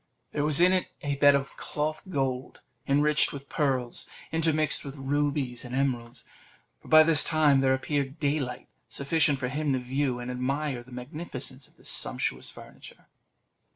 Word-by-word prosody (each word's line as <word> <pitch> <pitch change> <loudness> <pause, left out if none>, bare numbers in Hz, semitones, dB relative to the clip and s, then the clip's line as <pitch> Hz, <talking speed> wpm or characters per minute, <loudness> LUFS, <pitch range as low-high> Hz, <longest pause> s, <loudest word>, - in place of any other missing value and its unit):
There 145 - -1
was 150 0 +3
in 180 +2 +6
it 185 -1 +1 0.2
a 145 -1 -1
bed 145 0 +6
of 135 0 -2
cloth 155 +1 -3
of - - -10
gold, 135 -3 -2 0.3
enriched 150 +2 +4
with 140 -1 -9
pearls, 130 -5 -1 0.2
intermixed 160 -1 +1
with 140 -1 -7
rubies 140 -2 -1
and 125 0 -6
emeralds; 125 -3 -2 0.6
for - - -16
by 155 0 +8
this 155 -2 +3
time 150 -4 +4
there 130 0 +3
appeared 140 +1 -2
daylight 140 -4 -1 0.2
sufficient 150 +1 +1
for 130 -1 -3
him 145 +1 -1
to 130 - +1
view 130 +1 -1
and 125 +1 -5
admire 135 +1 -2
the 125 +2 -17
magnificence 130 0 -6
of - - -23
this - - -5
sumptuous - - 0
furniture. - - -13
140 Hz, 165 wpm, -28 LUFS, 130-150 Hz, 0.6 s, by